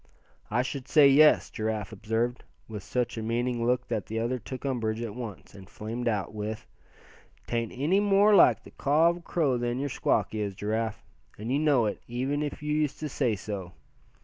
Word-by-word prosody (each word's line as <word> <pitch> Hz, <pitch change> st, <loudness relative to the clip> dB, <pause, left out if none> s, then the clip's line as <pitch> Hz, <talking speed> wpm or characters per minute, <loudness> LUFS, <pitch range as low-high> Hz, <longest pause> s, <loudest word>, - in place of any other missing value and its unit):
"I 120 Hz, +4 st, +1 dB
should 135 Hz, 0 st, -5 dB
say, 150 Hz, -2 st, +6 dB
yes," 150 Hz, +3 st, +5 dB
Giraffe 110 Hz, -2 st, -3 dB
observed, 115 Hz, +4 st, -2 dB, 0.2 s
with 105 Hz, -2 st, -6 dB
such 120 Hz, +3 st, -2 dB
a -, -, -4 dB
meaning 120 Hz, +1 st, -1 dB
look 125 Hz, 0 st, +1 dB
that 110 Hz, -4 st, -3 dB
the 110 Hz, -, -4 dB
other 120 Hz, +3 st, -1 dB
took 130 Hz, +5 st, -8 dB
umbrage 115 Hz, -5 st, -1 dB
at 110 Hz, -3 st, -5 dB
once, 115 Hz, -5 st, -8 dB
and 100 Hz, -1 st, -13 dB
flamed 115 Hz, +4 st, -5 dB
out 105 Hz, -3 st, -1 dB
with: 110 Hz, +1 st, -5 dB, 0.8 s
"'Tain't 115 Hz, -1 st, -2 dB
any 155 Hz, +10 st, +2 dB
more 205 Hz, +1 st, +4 dB
like 200 Hz, -, +6 dB
the -, -, -14 dB
caw 155 Hz, +4 st, +3 dB
of 170 Hz, -, -6 dB
a -, -, -12 dB
crow 150 Hz, -7 st, 0 dB
than 120 Hz, 0 st, -1 dB
your 140 Hz, +2 st, -2 dB
squawk -, -, 0 dB
is, 105 Hz, -3 st, -3 dB
Giraffe, 110 Hz, +2 st, -2 dB, 0.3 s
and 110 Hz, +4 st, -5 dB
you 140 Hz, -, +2 dB
know 145 Hz, -6 st, +3 dB
it, 105 Hz, -, -3 dB
even 130 Hz, +5 st, -2 dB
if 150 Hz, 0 st, -4 dB
you 150 Hz, 0 st, -1 dB
used 150 Hz, -2 st, 0 dB
to 155 Hz, -, -3 dB
say 125 Hz, -5 st, 0 dB
so. 95 Hz, -3 st, -6 dB
120 Hz, 200 wpm, -28 LUFS, 110-140 Hz, 0.8 s, say